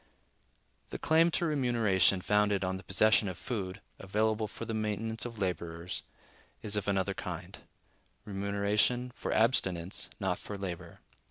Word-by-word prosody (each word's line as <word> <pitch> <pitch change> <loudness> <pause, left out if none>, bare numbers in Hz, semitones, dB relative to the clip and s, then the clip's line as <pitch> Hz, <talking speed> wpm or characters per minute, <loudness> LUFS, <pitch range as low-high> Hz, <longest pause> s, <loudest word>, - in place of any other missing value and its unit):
The - - -4
claim 160 +2 +4
to 170 - 0
remuneration 115 - +3
founded 105 0 +2
on 95 0 -1
the 95 - -10
possession 105 +3 +4
of 95 -3 -4
food, 95 -6 -4 0.2
available 110 +2 0
for 115 - -7
the 115 - -4
maintenance 110 +1 -2
of 115 -2 -6
laborers, 85 -2 -3 0.6
is 105 -1 0
of 105 - -2
another 95 -2 +1
kind; - - -6 0.7
remuneration 100 +5 +1
for - - -4
abstinence, 95 -6 +1
not 95 -3 -1
for 105 - -7
labor. 90 -3 -6
105 Hz, 140 wpm, -31 LUFS, 95-110 Hz, 0.7 s, claim